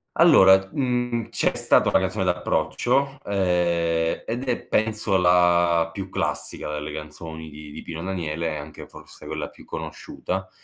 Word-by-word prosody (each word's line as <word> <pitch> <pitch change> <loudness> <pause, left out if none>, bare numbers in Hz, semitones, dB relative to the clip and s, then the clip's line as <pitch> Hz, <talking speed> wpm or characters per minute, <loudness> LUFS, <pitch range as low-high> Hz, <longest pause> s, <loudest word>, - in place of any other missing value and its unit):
Allora, 95 0 +6
mhmm, 125 -3 -1
c'è - - 0
stata - - +3
una - - +4
canzone 95 +1 -1
d'approccio, 125 +9 0
ehm, 85 -4 0
ed 120 +3 -3
è 125 -2 -1
penso 110 -2 0
la 85 -2 +4
più 95 +2 -6
classica 95 - -3
delle 75 0 -4
canzoni 80 +1 -8
di 75 0 -11
di 80 - -8
Pino 85 0 -7
Daniele, 85 -3 -3
e 75 - -4
anche 75 +1 -9
forse - - -13
quella - - -4
più - - -16
conosciuta. 95 0 -5
90 Hz, 145 wpm, -24 LUFS, 80-100 Hz, -, Allora